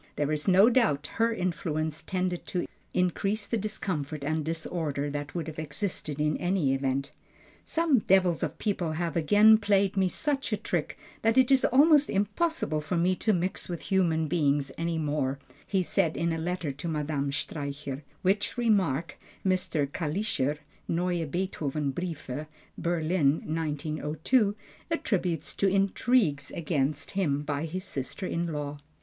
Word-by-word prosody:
There 145 0 0
is 150 +3 -2
no 195 +3 +7
doubt 225 - +3
her 230 0 +3
influence 160 -6 -2
tended 180 -1 -2
to 180 - -1 0.3
increase 195 +4 0
the - - -2
discomfort 170 -9 -3
and 155 +2 0
disorder 155 -3 -2
that 145 +1 -5
would 170 -3 -2
have 155 -1 -7
existed 155 -1 -3
in 150 0 +1
any 175 -7 +1
event. 135 +1 -1 0.5
"Some 325 -6 +2
devils 185 -4 +3
of - - -2
people 180 -7 -1
have 165 -1 -2
again 210 +7 +6
played 200 -2 +2
me 190 -1 +3
such 285 - -1
a - - +1
trick - - -2 0.2
that 225 +2 +2
it 260 0 +5
is 265 -1 +5
almost 295 +2 +5
impossible 205 - 0
for 170 +4 -2
me 180 +2 +3
to 220 - +1
mix 185 -1 -1
with 170 -2 -4
human 165 -4 +2
beings 145 -3 +1
any 165 0 -1
more," 145 -3 -1 0.3
he 190 -2 +1
said 165 -2 +1
in 170 0 +1
a - - -2
letter 175 -2 -2
to 140 +6 -6
Madame 150 -3 -1
Streicher, 140 -1 -4 0.2
which 200 +5 +1
remark 190 - +1 0.3
Mr. 180 -5 +1
Kalischer 150 -1 -1 0.3
(Neue 175 -1 0
Beethovenbriefe, 150 -3 -3 0.3
Berlin, 165 -3 +2
1902), 155 - 0 0.3
attributes 180 - -1
to 200 - +1
intrigues 195 - +2
against 150 -2 -1
him 150 -8 0
by 145 +1 -2
his 185 +3 -4
sister 145 +2 -4
in 170 -1 -1
law. 145 -1 -4
170 Hz, 145 wpm, -28 LUFS, 150-195 Hz, 0.5 s, no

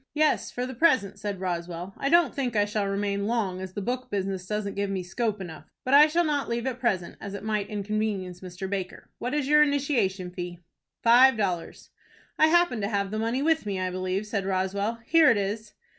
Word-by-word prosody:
"Yes, 305 0 +2
for 245 - -3
the 260 - -6
present," 235 - +2
said 200 -2 -4
Roswell. 175 0 -4
"I 275 - -1
don't 340 +2 +4
think 255 -5 -2
I 205 -1 +3
shall 205 -1 -1
remain 200 0 -1
long, 205 -6 -1
as 190 -1 -7
the 205 - -4
book 250 +3 -3
business 195 -3 -3
doesn't 210 -1 -2
give 200 0 -2
me 190 -2 -2
scope 210 +3 -2
enough; 165 -5 -8 0.2
but 255 - 0
I 295 +2 +9
shall 335 +3 +2
not 290 -4 -1
leave 235 +1 -2
at 255 -2 -3
present, 190 -8 -1
as 200 0 -6
it 200 - -7
might 215 -2 -1
inconvenience 205 -3 -3
Mr. 185 +1 -6
Baker. 190 -2 -5
What 250 +4 -2
is 290 -3 0
your 300 +1 +6
initiation 245 -11 +1
fee?" 175 -1 -6 0.5
"Five 245 +2 +7
dollars." 180 -5 -3 0.5
"I 310 - +7
happen 335 -8 +3
to 200 - 0
have 200 -2 -1
the 215 - -2
money 230 +5 0
with 315 -7 +1
me, 195 -2 -2
I 185 0 -1
believe," 185 +2 -2
said 205 -2 -2
Roswell. 195 +4 -1
"Here 325 -2 +6
it 225 - +4
is." 210 +2 -3
205 Hz, 215 wpm, -27 LUFS, 190-250 Hz, 0.5 s, I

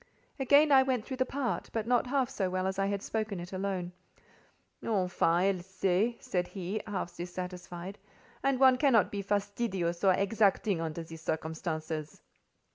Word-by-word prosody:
Again 285 +3 +5
I 270 -1 +8
went 260 -4 0
through 260 - -5
the 260 0 +1
part, 250 -10 -2
but 225 -2 -1
not 245 +1 +2
half 265 -1 +1
so 195 -7 -2
well 185 0 -1
as 190 +1 -2
I 195 - +2
had 200 0 -2
spoken 215 -4 -2
it 175 +2 -8
alone. 185 -2 -2 0.9
"Enfin, 190 -5 +1 0.3
elle - - -8
sait," 190 +5 0
said 180 -1 -1
he, 195 +2 -4
half 195 -4 -4
dissatisfied, 180 +1 -6 0.4
"and 275 -1 +1
one 260 -1 +6
cannot 250 -9 +4
be 200 - -3
fastidious 200 -3 -1
or 190 -2 +5
exacting 200 -2 +2
under 165 0 -3
the 165 0 -10
circumstances." 160 -1 -4
195 Hz, 160 wpm, -31 LUFS, 180-230 Hz, 0.9 s, I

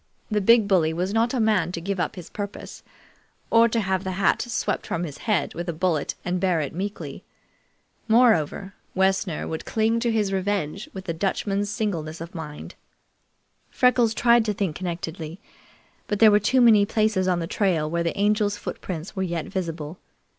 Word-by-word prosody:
The 210 -1 +1
big 225 +1 +5
bully 170 -5 +3
was 180 +4 -2
not 230 +2 +2
a 255 - -1
man 210 -6 +2
to 170 - -3
give 195 +2 -3
up - - -1
his 180 -3 -10
purpose, 205 -1 -7 0.7
or 230 0 +6
to 230 - 0
have 190 -1 -1
the 190 -1 -3
hat 195 +2 +2
swept 240 -1 -2
from 170 - -2
his 145 -4 -6
head 185 -9 +1
with 175 +1 -5
a - - -1
bullet 160 -3 -1
and 180 0 -1
bear 180 -3 +1
it 145 -3 -3
meekly. 195 +4 -5 0.8
Moreover, 220 -5 +3 0.2
Wessner 190 -2 +1
would 160 - -4
cling 225 +1 +1
to 235 0 0
his 210 -3 0
revenge 195 -2 -2
with 190 -1 -9
a 165 - -1
Dutchman's 200 +3 -1
singleness 170 -7 -3
of 165 +1 -8
mind. 150 -3 -8 1.0
Freckles 245 -3 +3
tried 235 0 +4
to 210 - 0
think 190 -6 -2
connectedly, 170 -1 -5 0.7
but 205 - -1
there 220 0 +7
were 205 - +5
too 250 +5 +2
many 220 -4 +7
places 210 -2 +1
on 180 -1 +2
the 170 - -2
trail 170 -4 0
where 170 +2 -1
the 170 0 -2
Angel's 205 0 +1
footprints 180 -3 -6
were 190 - -1
vet 170 -2 -3
visible. 165 -3 -5
190 Hz, 180 wpm, -24 LUFS, 170-215 Hz, 1.0 s, there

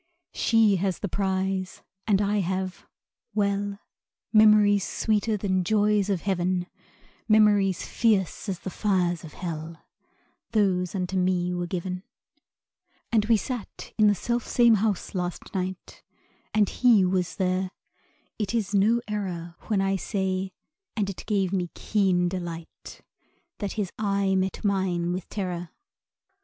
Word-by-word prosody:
She 220 -4 +3
has 190 0 -1
the 205 - -3
prize, 190 0 -2 0.2
and 205 -1 +3
I 205 +1 +1
have 185 0 -3 0.5
well, 200 -1 0 0.6
Memories 210 -2 +6
sweeter 215 +1 0
than 190 -2 0
joys 210 +1 +2
of 190 -4 0
heaven; 185 -2 0 0.6
Memories 205 -4 +4
fierce 210 -3 +1
as 185 -3 -3
the 190 - -5
fires 180 -5 0
of 160 - -10
hell 165 -2 -6 0.7
Those 185 -4 +1
unto 185 0 -2
me 180 -1 +1
were 175 0 -2
given. 180 +1 -3 1.1
And 220 -3 +3
we 225 0 +4
sat 245 0 -6
in 215 -1 +5
the 205 - +4
self 235 +5 -2
same 235 -2 +5
house 210 -4 -1
last 180 -2 -4
night; 185 -1 -4 0.5
And 210 -2 +3
he 230 -5 +4
was 180 -1 0
there. 185 0 0 0.7
It 210 +1 -1
is 210 -3 -1
no 215 +4 +3
error 180 -5 -4
When 210 -3 +1
I 195 0 +1
say 190 -1 -2 0.5
(and 200 -2 0
it 190 - -10
gave 195 -3 +1
me 180 -3 0
keen 185 -4 +1
delight) 175 -2 -7 0.6
That 205 -2 -3
his 205 -5 -2
eye 200 -2 +1
met 190 +2 -1
mine 180 -3 0
with 180 -1 -5
terror. 180 -4 -4
195 Hz, 135 wpm, -26 LUFS, 180-210 Hz, 1.1 s, Memories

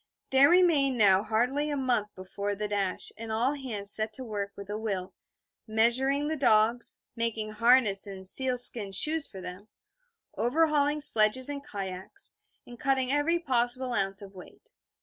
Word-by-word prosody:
There 270 +2 +5
remained 320 -8 +3
now 195 -3 +4
hardly 245 +8 -1
a 290 - -3
month 245 -6 -1
before 200 +2 -5
the 210 +1 -4
dash, 200 -2 -2
and 225 -1 -6
all 240 +5 0
hands 220 -8 -2
set 215 +1 +1
to 260 - -3
work 205 -4 -5
with 200 -1 -9
a 205 +1 -5
will, 195 -4 -5 0.5
measuring 250 +6 +2
the 315 +1 -2
dogs, 235 -3 +2
making 225 -2 -3
harness 220 -3 +2
and 190 -1 -9
seal 255 +6 0
skin 225 -5 +3
shoes 305 +9 +2
for 190 - -11
them, 185 +3 -10 0.7
overhauling 295 +3 +1
sledges 255 -1 +4
and 285 -1 -6
kayaks, 195 - -1 0.3
and 240 -1 -13
cutting 265 -2 0
every 290 +4 +1
possible 255 -4 -1
ounce 195 -1 -1
of 195 0 -13
weight. 185 -1 -15
235 Hz, 160 wpm, -27 LUFS, 205-270 Hz, 0.7 s, There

